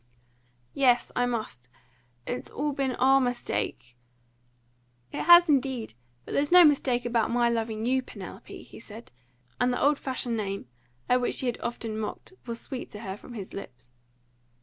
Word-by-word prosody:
"Yes, 250 -3 +3
I 245 0 +2
must. 215 - -4 0.6
It's 245 - -4
all 295 +2 -2
been 270 -2 -1
our 270 +2 +4
mistake 240 - -3 0.6
" 120 0 -40
"It - - -3
has 345 +1 +9
indeed! 265 - 0 0.3
But - - -9
there's 290 +2 +1
no 355 -1 +9
mistake 260 -5 +2
about 235 -2 +1
my 240 0 +2
loving 225 -1 -2
you, 260 +2 +2
Penelope," 255 - -10
he - - -13
said; 225 +1 -11 0.5
and 245 0 +3
the 245 - -1
old 285 0 +3
fashioned 250 -3 -3
name, 200 -6 -3 0.4
at 250 0 +3
which 245 - 0
she - - 0
had 240 -2 -1
often 230 -2 -4
mocked, 220 - -6
was 230 0 -4
sweet 260 -3 -7
to 210 - -8
her 190 -4 -5
from 240 - -12
his 195 -4 -7
lips. 125 -10 -10
240 Hz, 170 wpm, -27 LUFS, 215-265 Hz, 0.6 s, has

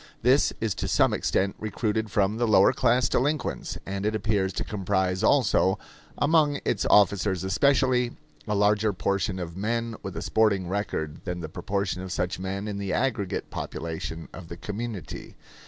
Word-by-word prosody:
This 130 +4 +4
is 110 -3 0
to - - -3
some - - +3
extent 95 0 0
recruited 110 0 -2
from 100 +2 +1
the 120 0 +1
lower 105 +1 +5
class 125 0 +3
delinquents, 145 +3 -1
and 95 +1 -4
it 105 +1 0
appears 105 -3 0
to - - -2
comprise 95 -2 -1
also, 105 -8 +3 0.4
among 145 -1 +3
its 105 - 0
officers 100 -2 +4
especially, 125 +4 +2 0.3
a 105 - 0
larger 105 +1 +3
proportion 100 +1 -1
of 85 -2 -5
men 115 +3 -2
with - - -6
a - - -3
sporting 100 -5 +2
record 85 -6 -3
than 90 -2 -3
the 80 - -5
proportion 100 0 -2
of 95 -1 -6
such 90 0 -2
men 95 +2 -4
in 100 -1 -4
the 100 -2 -3
aggregate 110 -5 -1
population 80 0 -5
of 90 -2 -9
the 85 - -8
community. 105 -2 -6
100 Hz, 165 wpm, -26 LUFS, 95-115 Hz, 0.4 s, lower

